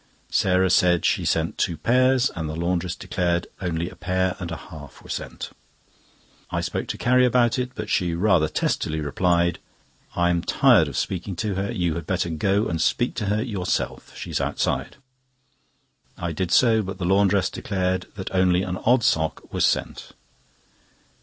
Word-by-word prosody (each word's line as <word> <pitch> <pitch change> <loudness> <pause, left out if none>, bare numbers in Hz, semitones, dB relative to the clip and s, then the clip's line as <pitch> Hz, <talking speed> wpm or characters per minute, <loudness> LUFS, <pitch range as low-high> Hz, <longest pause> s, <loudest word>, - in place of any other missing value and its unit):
Sarah 95 0 +2
said 90 -2 +3
she - - +1
sent 80 0 0
two 85 -4 0
pairs, 130 +1 +3
and 80 -3 -3
the 80 - -4
laundress 90 +1 -1
declared 85 -1 -1 0.2
only 85 -2 -2
a - - -10
pair 95 0 -1
and 90 -3 -5
a 85 - -4
half 75 -4 -12
were - - -9
sent. - - -6 1.0
I - - -1
spoke - - -3
to - - -4
Carrie 125 +1 +3
about 125 0 +3
it, 125 0 -3
but 110 -1 -5
she 90 -4 0
rather 90 -4 +3
testily 80 +1 -1
replied: 85 +4 +1 0.6
"I 85 0 +2
am 85 -1 +1
tired - - +4
of - - -5
speaking 95 +1 -3
to 100 +4 -2
her; 95 +4 -2
you 90 -7 0
had 85 -2 -6
better 90 -2 -1
go 100 +6 +1
and 80 -1 -2
speak 120 +6 +1
to 110 - -1
her 105 +2 +1
yourself. 100 -7 -3
She - - -7
is - - 0
outside." - - -1 1.2
I 85 - -3
did 90 +2 -2
so, 115 +2 +4
but 95 -1 -6
the 90 - -3
laundress 100 +1 +3
declared 95 -2 -2
that 95 -2 -6
only 95 -1 +3
an 90 0 -3
odd 120 +3 +2
sock 80 -4 0
was - - +2
sent. - - -2
90 Hz, 175 wpm, -24 LUFS, 85-105 Hz, 1.2 s, tired